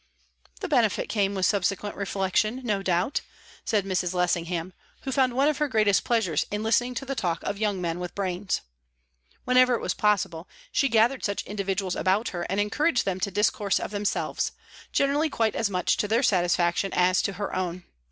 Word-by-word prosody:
"The 390 - -2
benefit 240 - +1
came 200 -2 0
with 190 -1 +1
subsequent 200 +1 0
reflection, 200 +4 0
no 210 -5 0
doubt," 185 +6 0 0.4
said 205 -3 0
Mrs. 185 -1 -1
Lessingham, 175 0 -1 0.3
who 270 - -4
found 260 -1 +2
one 275 +3 +3
of 305 -1 0
her 300 - +2
greatest 215 -6 +2
pleasures 220 -10 +1
in 210 +1 -3
listening 245 +3 +1
to 275 - -4
the 275 - -3
talk 175 -10 -2
of 200 - -3
young 210 -3 0
men 170 -1 -2
with 180 0 -6
brains. 190 0 -2 0.8
Whenever 250 0 +5
it - - -2
was - - -1
possible, 195 -5 0 0.2
she 275 - +2
gathered 230 +3 +3
such 200 -1 -1
individuals 195 -2 -2
about 200 +5 +1
her 175 -1 -4
and 195 - 0
encouraged 250 +7 +1
them 190 -1 -1
to 200 - -1
discourse 205 +1 +1
of - - -5
themselves, 205 0 -1 0.4
generally 285 +3 +2
quite 225 -6 0
as 220 - 0
much 180 -2 +1
to 210 - 0
their 230 +5 +2
satisfaction 175 -2 +2
as 180 +1 +3
to 200 - -2
her 200 +2 -4
own. 180 -1 -3
200 Hz, 185 wpm, -26 LUFS, 185-230 Hz, 0.8 s, Whenever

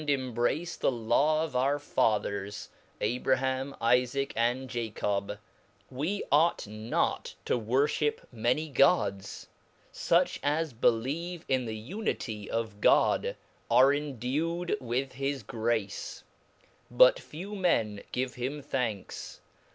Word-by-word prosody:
embrace 135 +5 0
the - - +2
Law 145 +7 +2
of 160 -4 -5
onr 135 +3 +2
fathers, 105 -6 -1 0.3
Ahraham, 130 +2 0
Jfaac, 125 +3 +2
and 120 +3 0
Jacob, 105 -4 -2 0.6
yvt 160 +10 -2
ought 160 +4 +3
not 110 +2 -2
to - - +1
vvorfhip 140 +6 +1
many 125 +7 0
gods; 130 - +1 0.5
fuch - - +2
as 150 0 0
believe 145 +10 0
in 130 -2 +1
the 110 -1 -4
unity 110 - -4
of 110 -3 -3
God, - - +3 0.3
are 135 +2 +6
endued 150 +5 -1
with 130 +2 -2
his 135 +1 -3
grace, 115 -3 -2 0.7
but 125 +1 +6
few 185 +7 -8
men 110 - +1
give 130 +1 -2
him 130 +4 -4
'^ - - -21
thanks. 115 -7 -3
130 Hz, 110 wpm, -29 LUFS, 115-145 Hz, 0.7 s, are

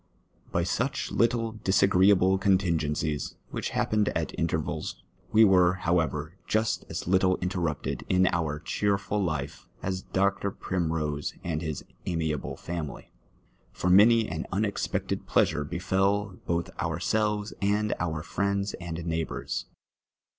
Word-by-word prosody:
By 85 - +1
such 115 +9 -1
little 115 -2 +1
disagreeable 95 0 +4
contigencics, 80 -6 +1 0.2
which - - -3
happened 105 -1 +1
at - - -3
intervals, 80 -2 -2 0.3
wc 110 +1 +7
were, 90 -2 +5
however, 80 -2 -1
just 110 0 0
as - - -4
little 95 0 +3
inteiTupted 85 -5 -2
in 95 0 +4
our 80 -4 -1
cheerful 100 +3 0
life 80 -5 -3 0.2
as 95 0 -2
Dr. 100 +1 0
Primrose 80 -6 -2
and 80 -2 -2
his 80 -4 -4 0.2
amiable 80 -4 -2
family; 85 -5 -6 0.6
for 90 - 0
many 110 +4 +6
an 80 0 -4
unexpected 100 +2 -1
pleasure 75 - +2
befell 95 +5 0
both 85 0 -1
ourselves 105 +5 0
and 105 +2 +1
oui 80 -3 -2
friends 100 0 -1
and 85 -1 -5
neighbours. 80 -7 -3
90 Hz, 120 wpm, -28 LUFS, 80-100 Hz, 0.6 s, wc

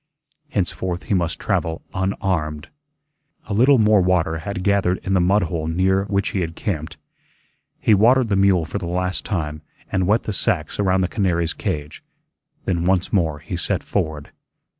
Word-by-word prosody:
Henceforth 90 -3 -2
he - - -2
must 85 -3 0
travel 80 0 -2
unarmed. 90 -6 -2 0.8
A 105 - -4
little 130 +6 +5
more 105 -3 +5
water 90 -3 +1
had 90 +2 -5
gathered 95 -2 +2
in 95 - -1
the 95 - +4
mud 100 +4 +3
hole 80 -1 -3
near 95 +4 +1
which 100 -1 0
he 95 - -2
had 80 -1 -3
camped. 80 -7 -4 0.8
He 110 - +3
watered 120 +5 +5
the 100 - +2
mule 95 -4 +3
for 100 - -4
the 90 - -5
last 90 +1 -2
time 75 -6 -3 0.3
and 95 -1 +1
wet 110 +3 +3
the 105 - -3
sacks 85 -3 -1
around 95 -2 +2
the 90 - +1
canary's 85 -5 0
cage. 75 0 -4 0.6
Then 85 -3 0
once 95 -1 +1
more 80 -6 +1
he 80 +4 -6
set 90 - -1
forward. 75 -2 -3
90 Hz, 170 wpm, -21 LUFS, 80-100 Hz, 0.8 s, little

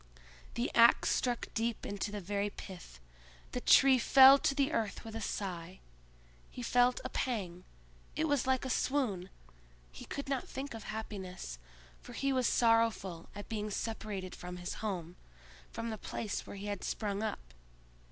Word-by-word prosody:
The 235 - -1
ax 235 0 +6
struck 245 -2 0
deep 230 0 -1
into 205 +1 -3
the 205 - -4
very 200 +2 -1
pith; 180 - -10 0.5
the 250 - -3
tree 265 0 +6
fell 270 +3 +8
to 275 - +1
the 280 +1 +2
earth 220 -3 -2
with 225 0 -7
a 225 - -4
sigh: 185 -3 -4 0.7
he 245 - -7
felt 245 +1 +3
a - - -2
pang—it 180 - -4
was 285 -4 +1
like 260 0 +1
a - - -3
swoon; 225 -12 0 0.6
he - - -10
could 280 - -5
not 270 -2 -2
think 275 0 -5
of 225 -2 -8
happiness, 190 - -6 0.4
for 245 - -11
he 275 +3 0
was 255 -2 +2
sorrowful 225 -7 +2
at 205 - -7
being 215 -2 -3
separated 210 -3 -4
from 180 0 -7
his 175 +1 -5
home, 180 -5 -4 0.5
from 230 0 -4
the 220 - -5
place 210 +1 -4
where - - -7
he 200 +1 -7
had 205 -2 -4
sprung 205 -2 -2
up. 65 - -4
215 Hz, 160 wpm, -33 LUFS, 190-245 Hz, 0.7 s, fell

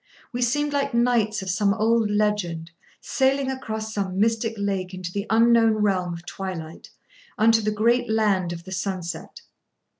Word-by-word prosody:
We 245 - -3
seemed 290 +4 +1
like 280 -4 0
knights 235 -4 +2
of 190 - -5
some 200 +2 +2
old 225 0 +2
legend, 205 -6 -1 0.3
sailing 270 0 +1
across 220 -4 -5
some 195 -2 -2
mystic 225 +1 +1
lake 195 -2 -2
into 185 -1 -6
the 200 +2 -4
unknown 230 0 +5
realm 195 -4 0
of 170 +1 -11
twilight, 175 -5 -7 0.5
unto 225 +1 +4
the 215 - 0
great 235 +3 +1
land 205 -5 +1
of 170 0 -7
the 190 - -11
sunset. 185 -3 -4
210 Hz, 155 wpm, -24 LUFS, 185-230 Hz, 0.5 s, unknown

